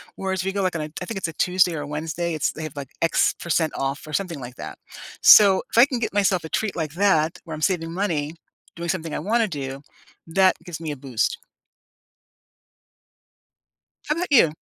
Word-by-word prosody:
whereas, 190 -1 -2
we 195 - -1
go, 200 +1 -2
like, 185 -2 0
on 165 - -2
a 150 - -7
I - - -3
think 220 +2 -5
it's 190 - -2
a 165 - -7
Tuesday 180 0 +2
or 150 -2 -4
Wednesday, 160 +3 -3
it's 155 - 0
they 160 - -9
have, 155 -2 -6
like, 140 -3 -7
x 165 - +3
percent 165 -2 0
off 135 +1 -3
or 155 - -10
something 175 -5 -2
like 125 -1 -9
that. - - -8 0.4
So, 200 -3 +8
if - - -4
I 240 - +9
can 265 -4 -2
get 230 -4 -3
myself 195 -3 +2
a 160 - -7
treat 215 +3 -1
like 160 -4 -3
that, 165 -4 +2
where 160 -2 -6
I'm 155 - -9
saving 165 -3 0
money, 165 -5 -2 0.4
doing 170 0 -5
something 165 -4 -2
I - - -2
wanna 220 +6 +1
do, 140 -5 -5 0.5
that 185 +3 +3
gives 165 -2 -8
me 160 -2 -3
a 145 - -6
boost. 130 -4 -1 2.7
How 300 - 0
'bout 355 +2 -2
you? 225 - +6
170 Hz, 210 wpm, -23 LUFS, 155-190 Hz, 2.7 s, I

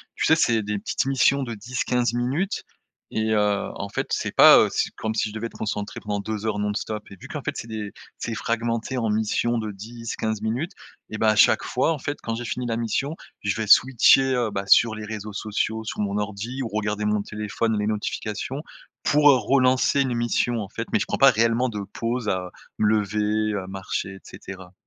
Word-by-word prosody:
tu - - 0
sais 160 - +6
c'est 120 -8 +2
des 105 0 -2
petites - - -1
missions 135 +1 +3
de 120 -2 -4
10-15 120 +2 -1
minutes 140 +11 -1 0.5
et 110 0 0
heu, 105 -1 +1
en 100 - -5
fait - - -3
c'est - - -1
pas, - - +9
heu, - - +4
si - - 0
comme 110 0 -3
si - - +1
je - - -10
devais 110 +1 -3
être - - -15
concentré 105 -1 -4
pendant 105 -1 -3
2 110 0 -4
heures 105 -2 -1
non 105 0 0
stop 105 0 -4
et 100 - -11
vu - - -11
qu'en - - -5
fait - - -2
c'est - - -6
des 110 -2 -5 0.3
c'est 115 - -4
fragmenté 115 +3 -2
en 115 -3 0
mission 110 +2 +1
de 110 -1 -3
10-15 110 +1 -5
minutes, 125 - -2 0.4
et 110 - -5
ben 110 - +2
à 110 - +4
chaque 110 +1 +5
fois 130 +6 +1
en 155 - -2
fait 145 +3 -3
quand 115 - -2
j'ai 120 +1 -5
fini 125 +1 -3
la 115 -1 -1
mission, 125 +7 -1 0.3
je 100 - +1
vais 110 -1 -2
switcher, 130 +4 +6
heu, 120 -3 0
bah 100 -1 -3
sur 110 +2 +5
les 110 - -7
réseaux 105 -1 -6
sociaux, 110 +2 -2
sur 110 - -6
mon 100 -1 -1
ordi 105 +6 -4
ou 115 - -4
regarder 105 0 -2
mon 105 -1 +1
téléphone 105 +2 -2
les 105 - 0
notifications, 110 +5 -3 0.4
pour, 150 0 +5
heu, 140 - +8
relancer 130 +1 +3
une 130 -3 0
mission 120 0 0
en 100 - -6
fait - - -5
mais - - +4
je - - -1
prends - - -2
pas - - +7
réellement 115 +3 +2
de 105 -4 -4
pause 115 -1 -2
à 90 -1 -2 0.3
me 105 - +2
lever, 105 0 +1
à 95 - -9
marcher 95 0 -4
et - - -12 0.2
cetera. 95 -2 -10
110 Hz, 220 wpm, -24 LUFS, 105-120 Hz, 0.5 s, pas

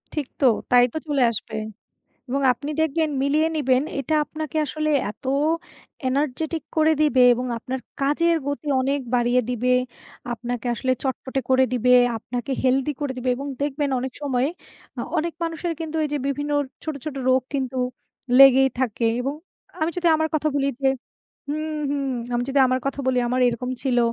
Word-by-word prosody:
ঠিক 290 -4 -2
তো? - - +4 0.3
তাই 245 0 +7
তো - - -2
চলে 285 -3 +1
আসবে। 220 - -6 0.7
এবং 275 +2 0
আপনি 285 +5 -7
দেখবেন, 315 0 +1
মিলিয়ে 300 +3 +2
নিবেন। 260 -3 +2 0.2
এটা 275 +4 -2
আপনাকে 310 0 -5
আসলে 305 +2 -2 0.2
এত - - -29 0.8
এনার্জেটিক 300 +4 -1
করে 315 0 +5
দিবে 275 -4 +4
এবং 250 +2 -3
আপনার 255 +3 -4 0.2
কাজের 335 +5 +2
গতি 285 +1 -3
অনেক 280 +2 0 0.2
বাড়িয়ে 245 +1 +3
দিবে, 250 +1 +1 0.6
আপনাকে 245 +1 -5
আসলে 255 +3 -1
চটপটে 265 0 -2
করে 260 0 +5
দিবে, 250 +1 +3 0.2
আপনাকে 245 +4 -5
হেলথি 265 +2 +2
করে 285 -2 -1
দিবে 255 +1 -1
এবং 275 +3 -5
দেখবেন 285 0 -1
অনেক 260 0 -4
সময়, 265 -2 +1 0.5
আ - - -1 0.2
অনেক 335 +1 -1
মানুষের 330 +1 -2
কিন্তু 320 -1 -5
এই 300 - -1
যে 295 - +1
বিভিন্ন 290 +1 -2 0.3
ছোট, 315 -2 -3
ছোট 295 -3 -4
রোগ 260 0 +4
কিন্তু 265 -2 -2 0.6
লেগেই 270 0 +8
থাকে। 235 -2 0 0.2
এবং 275 +3 -2 0.5
আমি 320 - +2
যদি 350 -1 +2
আমার 315 0 +1
কথা 310 0 +1
বলি 275 0 +1
যে 270 - +3 0.6
হুম, 310 +1 -3
হুম। 285 -1 -1 0.3
আমি 240 - +1
যদি 275 +1 +1
আমার 255 0 +1
কথা 275 - -2
বলি, 255 -1 +2
আমার 255 +1 0
এরকম 245 +1 -3
ছিল। 255 -3 +1
275 Hz, 170 wpm, -23 LUFS, 255-300 Hz, 0.8 s, লেগেই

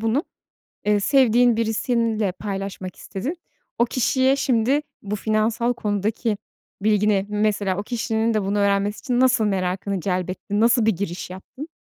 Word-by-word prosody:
bunu, 225 +7 +1 0.6
eee, 210 0 +3
sevdiğin 245 -1 +4
birisiyle 225 -2 0
paylaşmak 195 -2 -5
istedin. 270 - -5 0.4
O 235 - +4
kişiye 260 +2 +2
şimdi 265 +2 +2 0.2
bu 205 +1 -3
finansal 220 +3 +1
konudaki 210 0 -1 0.4
bilgini, 210 -2 +2
mesela 210 -2 0
o 200 - -2
kişinin 225 0 -1
de 215 -2 +1
bunu 200 +2 -1
öğrenmesi 200 +1 +1
için 250 -3 -1
nasıl 255 -3 +4
merakını 190 0 -1
celbettin? 185 +2 -2
Nasıl 235 0 +4
bir 225 - +5
giriş 180 -1 -4
yaptın? 190 - -9
215 Hz, 135 wpm, -23 LUFS, 200-235 Hz, 0.6 s, bir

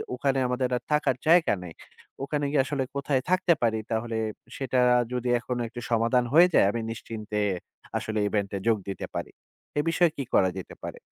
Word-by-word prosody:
ওখানে 135 +1 +1
আমাদের 125 0 0
আর - - -7
থাকার 150 -3 +2
জায়গা 165 -6 +5
নাই। 85 -2 -8 0.5
ওখানে 145 +1 -1
গিয়ে 140 -2 +3
আসলে 140 -1 -1
কোথায় 140 -1 0
থাকতে 185 -1 +4
পারি 110 -1 +2
তাহলে 115 +1 -1 0.4
সেটা 130 -1 0 0.3
যদি 125 0 -1
এখন 125 +1 -4
একটা 120 +1 -8
সমাধান 115 +2 +3
হয়ে 170 +3 +8
যায় - - +6
আমি 115 - -3
নিশ্চিন্তে 110 -1 -6 0.6
আসলে 110 -1 -2
ইভেন্টে 100 -1 -1
যোগ 115 -1 +4
দিতে 100 - -4
পারি। - - -4 0.5
এ - - +4
বিষয়ে 170 0 +3
কি 140 - -2
করা 95 - +5
যেতে 95 - -8
পারে? - - -6
125 Hz, 180 wpm, -27 LUFS, 110-140 Hz, 0.6 s, হয়ে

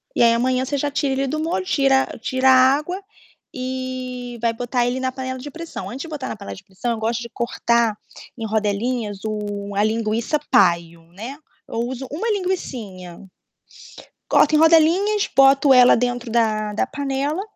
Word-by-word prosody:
E - - +1
aí, 230 -1 +6
amanhã, 255 +2 +1
você 285 +2 -2
já 285 +1 -1
tira 280 -1 0
ele 270 +1 -1
do 310 +4 -2
molho, 330 +4 -2
tira 270 -6 +3
tira 260 +3 +1
a - - +8 0.2
água 355 +7 -4 0.5
e 255 -1 -5
vai 230 -1 +2
botar 245 +1 -1
ele 245 +2 -1
na 260 0 -1
panela 260 0 -5
de 290 - -7
pressão. 335 +3 -7
Antes 260 +3 -6
de - - -8
botar 295 -5 -5
na - - -4
panela 200 -1 -8
de 195 - -14
pressão, 195 +5 -4
eu 230 - -2
gosto 230 +1 -1
de 235 - -7
cortar 235 -2 0 0.4
em 225 - -4
rodelinhas 215 0 -1
o 205 -2 -4
a 205 - +2
linguiça-paio, 215 - +1
né. 230 +9 -7 0.3
Eu 230 - -4
uso 260 +1 -6
uma 360 +11 -2
linguicinha, 225 - -4 1.0
coloco 310 - +4
em - - +5
rodelinhas, 335 +6 +4
boto 275 +1 +6
ela 250 -1 +7
dentro 245 0 -2
da 215 -2 +1
da 220 - 0
panela, 280 +5 -2
255 Hz, 175 wpm, -21 LUFS, 225-275 Hz, 1.0 s, a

